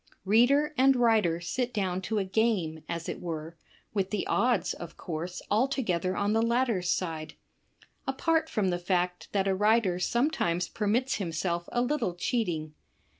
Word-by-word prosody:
Reader 255 +9 +4
and 270 +1 +6
writer 220 -9 +3
sit 240 +9 -2
down 190 -3 -1
to 220 - 0
a 200 - +2
game, 185 -6 0
as 170 -1 -4
it - - -5
were, 165 -1 -5 0.4
with 195 -2 0
the 210 -2 -2
odds, 240 -6 +1
of 170 - -9
course, 175 +2 -5
altogether 205 -6 +1
on 205 +1 +1
the 225 - +3
latter's 230 -6 +1
side, 160 -4 -2 0.4
— - - -31
apart 320 +4 +1
from 195 -4 0
the 175 - -1
fact 180 0 -1
that 195 -1 +1
a 195 - +2
writer 210 -2 +2
sometimes 180 - +1
permits 230 +5 0
him 185 -5 -3
self 170 +1 -2
a 240 - +1
little 250 -9 -1
cheating. 175 - -1
195 Hz, 165 wpm, -29 LUFS, 175-235 Hz, 0.4 s, and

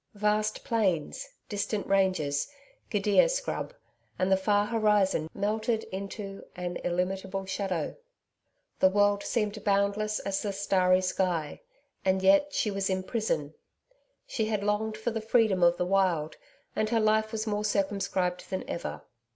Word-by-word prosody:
Vast 210 +1 0
plains, 210 - 0 0.2
distant 205 0 -2
ranges, 185 -8 +1 0.4
gidia 205 - +4
scrub - - -2 0.5
and 185 +1 +1
the - - +7
far 205 +2 +2
horizon 210 -7 +2
melted 220 +2 -1
into 195 +1 -6
an 180 -1 -4
illimitable 190 +2 -2
shadow. 190 -4 -2 0.8
The 190 - +6
world 205 +1 +3
seemed 210 -3 -2
boundless 200 +1 +1
as 195 -1 -2
the 205 -2 -2
starry 185 -2 +3
sky 180 - -1 0.4
and 190 0 +1
yet 195 +10 +5
she 215 - 0
was 195 0 -1
in 185 0 0
prison! 175 -9 -2 0.7
She 220 - -1
had 210 -2 -1
longed 215 +1 0
for 220 +2 -2
the 225 0 -3
freedom 220 -4 +2
of 175 0 +5
the 180 - 0
wild, 180 -5 +1 0.4
and 215 0 0
her 230 0 +2
life 215 0 +2
was 220 -1 -2
more 210 -1 -1
circumscribed 195 -3 -1
than 190 - -4
ever. 170 - -5
200 Hz, 145 wpm, -29 LUFS, 185-215 Hz, 0.8 s, the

